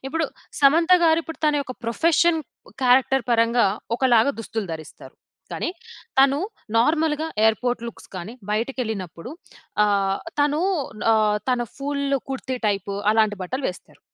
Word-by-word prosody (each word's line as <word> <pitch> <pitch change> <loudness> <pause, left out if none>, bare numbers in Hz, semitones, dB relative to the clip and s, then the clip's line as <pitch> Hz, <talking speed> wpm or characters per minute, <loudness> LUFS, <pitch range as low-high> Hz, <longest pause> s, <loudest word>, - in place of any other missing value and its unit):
ఇప్పుడు 325 +3 -1 0.4
సమంత 325 +6 +5
గారు 320 0 +5
ఇప్పుడు, 325 - -8
తన 300 - +3
యొక్క 260 - -7
ప్రొఫెషన్, 325 +6 +2 0.4
క్యారెక్టర్ 260 0 +4
పరంగా, 230 0 +3 0.3
ఒకలాగా 250 +1 +3
దుస్తులు 220 -2 -4
ధరిస్తారు. 160 -1 -10 0.4
కానీ, - - -2 0.5
తను 275 +1 +5 0.4
నార్మల్‌గా 310 +3 +2 0.2
ఎయిర్పోర్ట్ 235 +2 +1
లుక్స్ - - -13
గానీ, 185 +5 -6 0.2
బయటికెళ్ళినప్పుడు 220 - -3 0.5
ఆహ్, 195 -1 +1 0.2
తను 295 +2 +2 0.5
ఆహ్, 210 -1 +2
తన 250 -1 +1 0.2
ఫుల్ 280 0 -2 0.2
కుర్తీ 260 -1 -3
టైపు 200 -1 -2 0.2
అలాంటి 215 -1 +2
బట్టలు 260 +9 -4
వేస్తారు. 180 - -16
245 Hz, 125 wpm, -23 LUFS, 215-285 Hz, 0.5 s, సమంత